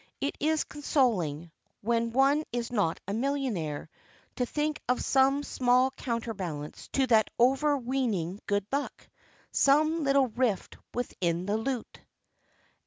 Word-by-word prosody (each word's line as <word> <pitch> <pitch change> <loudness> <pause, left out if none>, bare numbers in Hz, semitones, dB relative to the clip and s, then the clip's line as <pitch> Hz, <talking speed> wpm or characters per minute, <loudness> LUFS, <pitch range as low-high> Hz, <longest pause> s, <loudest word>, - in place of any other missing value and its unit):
It 280 - -2
is 315 +1 +1
consoling 190 - 0 0.3
when 230 +1 0
one 275 +5 +3
is 240 -1 -3
not 200 -8 0
a 200 - -2
millionaire 225 - -2 0.5
to 250 - 0
think 300 +2 -2
of 250 - +2
some 270 +2 +3
small 255 0 +2
counterbalance 200 - -5
to 270 - +3
that 220 -4 +4
overweening 250 - +1
good 205 -1 +1
luck, 280 +1 -3 0.4
some 310 +3 +3
little 275 -2 +3
rift 230 -4 -1 0.2
within 180 -8 -1
the 205 +2 0
lute. 245 +1 -4
245 Hz, 120 wpm, -29 LUFS, 205-275 Hz, 0.5 s, that